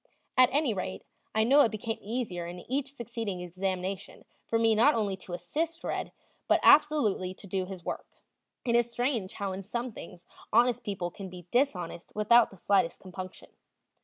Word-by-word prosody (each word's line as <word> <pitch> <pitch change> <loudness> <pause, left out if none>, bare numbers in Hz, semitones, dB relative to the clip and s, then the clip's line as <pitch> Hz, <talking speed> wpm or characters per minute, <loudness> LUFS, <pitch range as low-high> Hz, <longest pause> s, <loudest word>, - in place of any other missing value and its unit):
At 255 -1 +7
any 280 -3 +2
rate, 185 -1 -4 0.3
I 220 - +4
know 275 +6 +6
it 245 - +5
became 220 +1 -4
easier 205 -6 -3
in 175 +1 -7
each 275 +4 -2
succeeding 230 -7 -4
examination 185 +2 -4 0.2
for 230 - +1
me 225 0 +4
not 240 +8 +5
only 205 -3 0
to 185 -1 -9
assist 330 - -3
"Red," - - -3 0.4
but - - +4
absolutely 220 -12 +4
to - - -12
do 190 -1 -2
his 185 -2 -8
work. - - -4 0.6
It 235 -1 +2
is 240 0 +3
strange 240 -5 -1
how 200 -2 -3
in 190 +1 -4
some 235 +5 -4
things 180 -4 -11 0.3
honest 240 +1 +4
people 190 -4 -3
can 190 +1 -8
be 180 -1 -10
dishonest 185 -10 0
without 220 +3 +5
the 195 - -15
slightest 185 -2 +2
compunction. 185 0 -9
210 Hz, 175 wpm, -29 LUFS, 185-240 Hz, 0.6 s, At